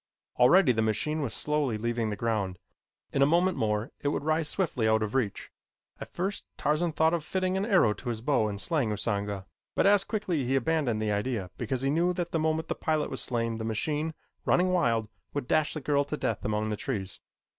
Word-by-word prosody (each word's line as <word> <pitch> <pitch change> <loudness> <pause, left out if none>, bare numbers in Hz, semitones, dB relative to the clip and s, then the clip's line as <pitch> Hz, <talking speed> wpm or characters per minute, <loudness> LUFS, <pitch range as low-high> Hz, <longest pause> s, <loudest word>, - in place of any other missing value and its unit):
Already 140 +4 +6
the 110 -2 +1
machine 110 +9 0
was 135 -6 -2
slowly 150 -6 -1
leaving 115 0 -1
the 105 - -2
ground. 105 -5 -1 0.6
In 135 - +1
a 140 - +6
moment 175 +4 +3
more 105 +3 -1
it - - -2
would 145 - 0
rise 155 0 +1
swiftly 150 - 0
out 110 0 +3
of 105 - -3
reach. 120 -7 -1 0.5
At - - -8
first 190 +3 -3
Tarzan 155 +3 +1
thought 160 +2 +3
of 170 -3 0
fitting 185 +3 -1
an 195 +2 0
arrow 180 - +4
to 125 - -6
his 115 -2 -3
bow 125 -4 +2
and 100 -1 -4
slaying 135 +2 0
Usanga, 100 -2 -2 0.3
but - - +3
as 200 0 +6
quickly 190 - -1
he 130 +2 0
abandoned 135 -5 +1
the 105 - 0
idea 105 -3 -2
because 130 -1 -2
he 135 - +2
knew 175 +4 +2
that 175 -1 -3
the 165 - 0
moment 160 +1 0
the - - 0
pilot 155 -1 -1
was 130 - -1
slain 115 -2 -1
the - - -3
machine, 150 +8 -1 0.3
running 180 +1 +3
wild, 115 -12 +2 0.3
would 145 -4 -2
dash 155 +2 +2
the 155 - -4
girl 140 +1 +2
to 150 +2 -4
death 110 - -2
among 105 0 -1
the - - 0
trees. 100 -8 -3
135 Hz, 215 wpm, -28 LUFS, 110-160 Hz, 0.6 s, Already